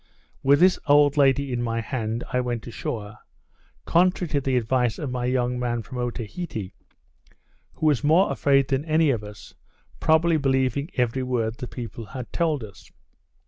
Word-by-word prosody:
With 140 Hz, +1 st, +4 dB
this 185 Hz, 0 st, +5 dB
old 145 Hz, 0 st, +5 dB
lady 140 Hz, -2 st, +3 dB
in 120 Hz, -, -1 dB
my 115 Hz, -1 st, -1 dB
hand 115 Hz, -1 st, -3 dB
I 125 Hz, -, +2 dB
went 120 Hz, -2 st, -3 dB
ashore, 110 Hz, -2 st, -6 dB, 0.7 s
contrary 180 Hz, 0 st, +2 dB
to 145 Hz, -2 st, 0 dB
the 130 Hz, -1 st, 0 dB
advice 120 Hz, 0 st, +1 dB
of 145 Hz, -5 st, -4 dB
my 125 Hz, -1 st, -2 dB
young 125 Hz, -1 st, 0 dB
man 120 Hz, -2 st, -2 dB
from 125 Hz, +3 st, -7 dB
Otaheite, 120 Hz, -, -4 dB, 1.0 s
who -, -, -4 dB
was 150 Hz, -3 st, +3 dB
more 165 Hz, +6 st, +4 dB
afraid 135 Hz, -1 st, +2 dB
than 135 Hz, 0 st, 0 dB
any 155 Hz, -2 st, +3 dB
of 115 Hz, -5 st, -2 dB
us, 105 Hz, -1 st, -11 dB, 0.5 s
probably 160 Hz, +1 st, +3 dB
believing 135 Hz, +1 st, 0 dB
every 125 Hz, 0 st, 0 dB
word 120 Hz, -3 st, -2 dB
the 125 Hz, -, -5 dB
people 115 Hz, -2 st, -7 dB
had 125 Hz, +4 st, -8 dB
told 155 Hz, -7 st, 0 dB
us. 100 Hz, -3 st, -13 dB
130 Hz, 165 wpm, -24 LUFS, 120-145 Hz, 1.0 s, this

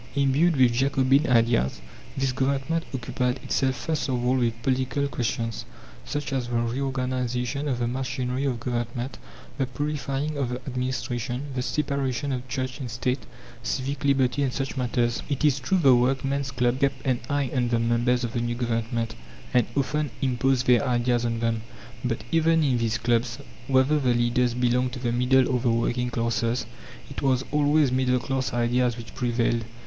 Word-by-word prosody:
Imbued 140 Hz, +5 st, +3 dB
with 125 Hz, -2 st, +5 dB
Jacobin 135 Hz, +3 st, +3 dB
ideas, 115 Hz, -, +3 dB, 0.4 s
this 135 Hz, -1 st, +1 dB
Government 135 Hz, +5 st, 0 dB
occupied 125 Hz, 0 st, -1 dB
itself 130 Hz, -1 st, +1 dB
first 150 Hz, +3 st, -2 dB
of 125 Hz, -1 st, -1 dB
all 125 Hz, +1 st, +3 dB
with 115 Hz, -2 st, 0 dB
political 130 Hz, +2 st, 0 dB
questions, 115 Hz, -3 st, -2 dB, 0.4 s
such 145 Hz, -, -3 dB
as 130 Hz, -3 st, -1 dB
the 120 Hz, -, -3 dB
reorganization 125 Hz, +2 st, -1 dB
of 130 Hz, -4 st, 0 dB
the 120 Hz, -1 st, 0 dB
machinery 125 Hz, +1 st, -2 dB
of 125 Hz, -4 st, -1 dB
government, 120 Hz, +1 st, -3 dB, 0.4 s
the 135 Hz, -, +1 dB
purifying 145 Hz, +2 st, -2 dB
of 130 Hz, -3 st, 0 dB
the 125 Hz, -, -2 dB
administration, 125 Hz, 0 st, -3 dB
the 130 Hz, -, -1 dB
separation 140 Hz, -1 st, -1 dB
of 130 Hz, 0 st, -3 dB
Church 130 Hz, +1 st, -3 dB
and 130 Hz, -3 st, -5 dB
State, 125 Hz, +3 st, -2 dB, 0.3 s
civic 135 Hz, +3 st, -3 dB
liberty, 140 Hz, 0 st, +2 dB
and 135 Hz, -2 st, +1 dB
such 135 Hz, +1 st, -3 dB
matters. 120 Hz, -2 st, 0 dB
It 140 Hz, +1 st, 0 dB
is 140 Hz, -2 st, +3 dB
true 135 Hz, +9 st, +1 dB
the 140 Hz, -7 st, +6 dB
workmen's 135 Hz, +2 st, +1 dB
clubs 125 Hz, 0 st, 0 dB
kept 135 Hz, -2 st, 0 dB
an 130 Hz, -3 st, +1 dB
eye 140 Hz, -3 st, 0 dB
on 125 Hz, -2 st, +2 dB
the 120 Hz, -, +2 dB
members 120 Hz, +2 st, +1 dB
of 120 Hz, -1 st, -3 dB
the 120 Hz, -, -1 dB
new 120 Hz, 0 st, -1 dB
Government, 115 Hz, -1 st, -1 dB, 0.4 s
and 125 Hz, -3 st, +4 dB
often 150 Hz, +2 st, 0 dB
imposed 130 Hz, 0 st, +1 dB
their 125 Hz, 0 st, +5 dB
ideas 120 Hz, -2 st, +1 dB
on 115 Hz, -1 st, -1 dB
them. 115 Hz, -1 st, 0 dB, 0.4 s
But 120 Hz, -2 st, -2 dB
even 165 Hz, 0 st, +3 dB
in 130 Hz, -4 st, +2 dB
these 115 Hz, -1 st, 0 dB
clubs, 120 Hz, 0 st, 0 dB, 0.3 s
whether 135 Hz, +3 st, +3 dB
the 125 Hz, -3 st, +2 dB
leaders 120 Hz, 0 st, +2 dB
belonged 125 Hz, 0 st, +1 dB
to 130 Hz, -, -5 dB
the 120 Hz, -1 st, -1 dB
middle 125 Hz, +2 st, +3 dB
or 125 Hz, -1 st, +1 dB
the 120 Hz, 0 st, +1 dB
working 120 Hz, +2 st, 0 dB
classes, 115 Hz, +1 st, 0 dB, 0.5 s
it -, -, -5 dB
was 130 Hz, -1 st, +2 dB
always 150 Hz, -1 st, +3 dB
middle 130 Hz, 0 st, +2 dB
class 130 Hz, +1 st, -2 dB
ideas 120 Hz, 0 st, +1 dB
which 115 Hz, -1 st, -9 dB
prevailed. 120 Hz, -1 st, 0 dB
125 Hz, 175 wpm, -26 LUFS, 120-135 Hz, 0.5 s, the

